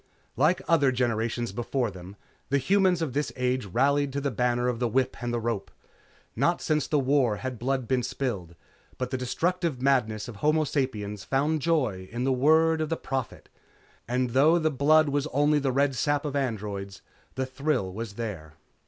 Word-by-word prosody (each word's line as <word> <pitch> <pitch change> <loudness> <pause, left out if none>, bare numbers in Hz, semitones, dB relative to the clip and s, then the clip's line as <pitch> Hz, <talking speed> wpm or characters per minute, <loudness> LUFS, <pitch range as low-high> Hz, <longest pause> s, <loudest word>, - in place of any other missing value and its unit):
Like 155 +8 +2
other 145 -5 +4
generations 120 -2 -1
before 120 +2 -2
them, 95 +1 -11 0.3
the 140 - +3
humans 185 +3 +2
of 140 -6 -3
this 145 +2 -1
age 125 -3 -1
rallied 140 +7 +2
to 140 - -1
the 140 -1 -1
banner 125 +1 0
of 120 -2 -1
the 125 - +1
whip 130 +3 0
and 120 0 -2
the 120 - -1
rope. 115 -4 -3 0.7
Not - - +2
since 155 -1 0
the 150 - +1
War 135 -4 +2
had 130 +1 -5
blood 130 0 -1
been 130 -1 +1
spilled, 120 -9 -4 0.4
but 125 0 -3
the 130 - -1
destructive 165 +3 -1
madness 120 -6 +1
of 115 -4 -9
homo 155 +5 +2
sapiens 105 -9 -2
found 150 +3 0
joy 125 - 0
in 120 +2 -3
the 135 0 +2
word 160 +4 +3
of 155 - -2
the 165 - -1
Prophet, 130 -3 -4 0.6
and 125 0 0
though 150 +7 +5
the 155 -2 +1
blood 150 +3 +4
was 145 +1 0
only 145 +2 +2
the 135 -2 0
red 140 +1 +2
sap 145 +4 0
of 145 -1 -3
androids, 105 -7 -3 0.3
the 130 - -1
thrill 130 -7 -1
was 110 0 -5
there. 95 -9 -6
130 Hz, 185 wpm, -27 LUFS, 115-145 Hz, 0.7 s, though